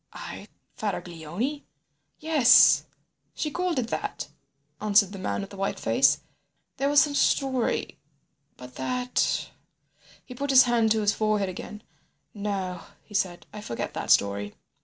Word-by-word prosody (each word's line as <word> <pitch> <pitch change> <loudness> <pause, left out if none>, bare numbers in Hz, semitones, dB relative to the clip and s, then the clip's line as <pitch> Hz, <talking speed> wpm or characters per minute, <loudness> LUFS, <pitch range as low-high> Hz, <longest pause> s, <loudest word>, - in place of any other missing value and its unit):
"I - - -8 0.3
Faraglioni? 185 - -4 0.5
Yes, 295 -6 +5 0.5
she 300 - -3
called 360 -1 -1
it 235 -3 -1
that," - - -4 0.5
answered 205 -2 +3
the 195 - -8
man 185 - -2
with 195 - -8
the 200 - -10
white 195 0 -2
face. - - +3 0.6
"There 275 - 0
was 290 0 +5
some 290 +1 +3
story—but 150 - -3
that—" 250 - -1 0.7
He 250 - -10
put 280 +3 -4
his 265 -1 +8
hand 235 -3 +2
to 220 - 0
his 205 0 +2
forehead 215 -3 0
again. 210 +3 -8 0.5
"No," 195 -4 -4 0.2
he - - -17
said, 185 -4 -1
"I 210 - -7
forget 120 - -5
that - - -5
story." 100 0 +2
210 Hz, 135 wpm, -26 LUFS, 180-255 Hz, 0.7 s, his